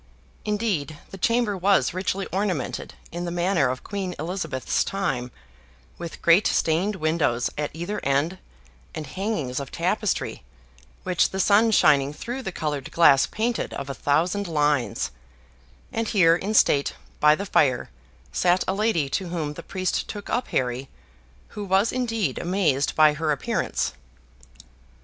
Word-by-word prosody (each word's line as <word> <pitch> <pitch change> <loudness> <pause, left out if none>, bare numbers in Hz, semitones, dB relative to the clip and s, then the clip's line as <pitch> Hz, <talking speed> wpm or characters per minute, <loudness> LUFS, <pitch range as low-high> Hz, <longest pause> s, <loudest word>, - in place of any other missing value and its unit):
Indeed, 205 -9 -1
the 195 - -8
chamber 230 0 +1
was 190 -7 +2
richly 190 +1 -2
ornamented 185 -8 -2 0.2
in 175 +1 -4
the - - -2
manner 175 -5 +1
of 130 0 -4
Queen 195 -3 -4
Elizabeth's 165 -4 -1
time, 150 -11 -2 0.7
with 170 -1 -8
great 170 +4 +5
stained 175 +6 +1
windows 155 -8 0
at 150 0 -2
either 175 +6 -4
end, 145 +7 0 0.6
and 155 - -4
hangings 150 - -3
of 140 -2 -7
tapestry, - - -1 0.6
which 180 -2 +2
the 190 - -5
sun 210 +4 +5
shining 145 -9 +4
through 245 - -5
the 190 - -4
colored 150 -5 -3
glass 145 -5 +5
painted 230 +2 -2
of 140 0 -5
a - - -4
thousand 175 +9 0
lines; 150 - 0 0.8
and 225 0 -1
here 170 -6 +5
in 200 +5 -3
state, 140 -8 +3 0.2
by 150 0 +6
the 200 - -5
fire, 130 - +2 0.4
sat 180 +1 +2
a 190 - +1
lady 200 -8 +1
to 190 +5 -2
whom 160 -4 -3
the - - -8
priest 185 -1 -2
took 205 -1 -6
up 245 - 0
Harry, 125 +1 -2 0.6
who 210 - -6
was 195 +3 +2
indeed 230 -5 -1
amazed 170 -7 +1
by 155 -1 +6
her 155 +1 -1
appearance. 145 - -1
175 Hz, 145 wpm, -24 LUFS, 145-200 Hz, 0.8 s, by